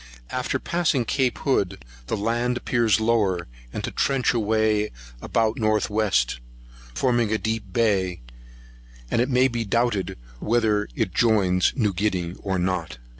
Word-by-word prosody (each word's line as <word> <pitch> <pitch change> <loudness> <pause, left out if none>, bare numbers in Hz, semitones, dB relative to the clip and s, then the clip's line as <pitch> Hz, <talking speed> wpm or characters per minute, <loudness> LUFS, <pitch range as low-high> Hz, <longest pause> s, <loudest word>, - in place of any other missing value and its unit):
After 125 -1 -1
passing 165 -8 0
Cape 130 +1 0
Hood, 95 - -1 0.2
the 110 - -1
land 120 +4 0
appears 115 -5 +2
lower, 105 -6 +1 0.2
and - - -5
to - - -3
trench 135 -3 +1
away 110 -1 +1 0.3
about 110 -1 0
north 110 -1 +1
west, 95 - +1 0.6
forming 120 -4 +1
a 110 - +2
deep 110 0 -3
bay; 100 -7 +1 0.9
and 115 - +2
it 125 - 0
may 130 0 +4
be 120 -2 -2
doubted 115 -2 0 0.2
whether 110 - +1
it - - -1
joins 100 -6 +3
New 105 -7 +1
Guinea 90 -3 -1
or 95 -2 -2
not. 90 -4 -2
110 Hz, 140 wpm, -24 LUFS, 100-120 Hz, 0.9 s, may